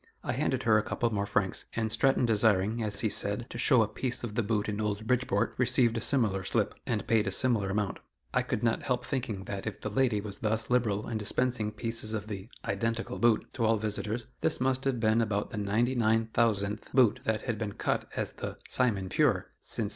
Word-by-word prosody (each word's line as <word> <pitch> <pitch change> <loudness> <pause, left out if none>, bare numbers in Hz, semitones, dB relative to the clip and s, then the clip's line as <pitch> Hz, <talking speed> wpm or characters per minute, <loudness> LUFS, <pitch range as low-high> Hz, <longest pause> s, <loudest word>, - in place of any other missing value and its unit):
I - - -1
handed - - 0
her 110 -2 +5
a - - -2
couple 115 +1 -1
more 100 0 -1
francs, 95 -2 0
and 110 -1 -1
Stratton 130 +3 +3
desiring, 110 -1 +2
as 105 -2 -1
he 110 - +1
said, 100 +4 +3
to 120 - -6
"show 125 -2 +5
a - - -1
piece 125 +4 -2
of 115 -3 -4
the 120 - +1
boot 105 -1 -1
in 105 0 -2
old 105 0 -2
Bridgeport," 115 -3 +1
received 120 -2 +3
a 115 - -2
similar 110 -8 +1
slip, - - 0
and - - -1
paid 110 -2 +2
a - - 0
similar 110 -3 +2
amount. 100 0 -1 0.3
I - - +3
could 105 - -3
not 115 -1 +1
help 125 -1 -1
thinking 115 -7 -3
that 100 +1 -5
if 105 - -4
the 105 - -4
lady 120 -2 +2
was 100 -1 -6
thus 110 +1 -1
liberal 110 -4 +1
in 115 -2 -2
dispensing 110 0 0
pieces 110 0 -3
of 105 -2 -4
the 105 0 -7 0.2
"identical 115 +1 -2
boot" 115 -2 +3
to 120 - -2
all 110 0 +3
visitors, 110 +2 -2
this - - 0
must 130 +1 0
have 130 -3 0
been 110 0 +3
about 105 -2 -1
the - - -5
ninety 105 +5 +1
nine 115 -2 +2
thousandth 105 -3 0
boot 125 -5 +4
that 110 -1 0
had 115 -4 -2
been 105 -3 -3
cut - - -2
as - - -2
the - - -6
"Simon 105 -7 +1
pure" 110 -4 +1
since - - -3
1815. - - -2
110 Hz, 220 wpm, -29 LUFS, 105-120 Hz, 0.3 s, her